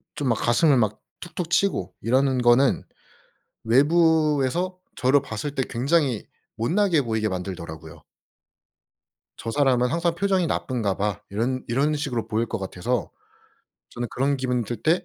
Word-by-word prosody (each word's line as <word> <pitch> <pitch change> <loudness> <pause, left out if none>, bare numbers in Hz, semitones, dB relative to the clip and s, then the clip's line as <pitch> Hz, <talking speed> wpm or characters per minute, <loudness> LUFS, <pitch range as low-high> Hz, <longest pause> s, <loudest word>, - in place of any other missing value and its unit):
좀 140 -3 -1
막 115 - +3
가슴을 135 +6 +3
막 110 -3 0 0.2
툭툭 175 -1 -6
치고 135 - +1
이러는 130 +3 +2
거는 120 +2 +4 0.8
외부에서 155 +5 +2 0.2
저를 130 +3 +3
봤을 140 +2 -5
때 135 - 0
굉장히 135 -2 0 0.3
못나게 165 - +2
보이게 110 -3 -1
만들더라고요. 85 -5 -7 1.4
'저 115 - -5
사람은 125 -2 +2
항상 170 +1 0
표정이 190 -1 +1
나쁜가봐.' 105 - -1
이런 120 +6 -2
이런 140 +6 +1
식으로 125 -7 -3
보일 115 +1 0
것 115 - -3
같아서 100 +5 -3 0.8
저는 120 0 -4
그런 140 +2 0
기분이 125 -2 -1
들 115 0 -6
때 165 +6 +2
130 Hz, 295 characters per minute, -24 LUFS, 115-150 Hz, 1.4 s, 거는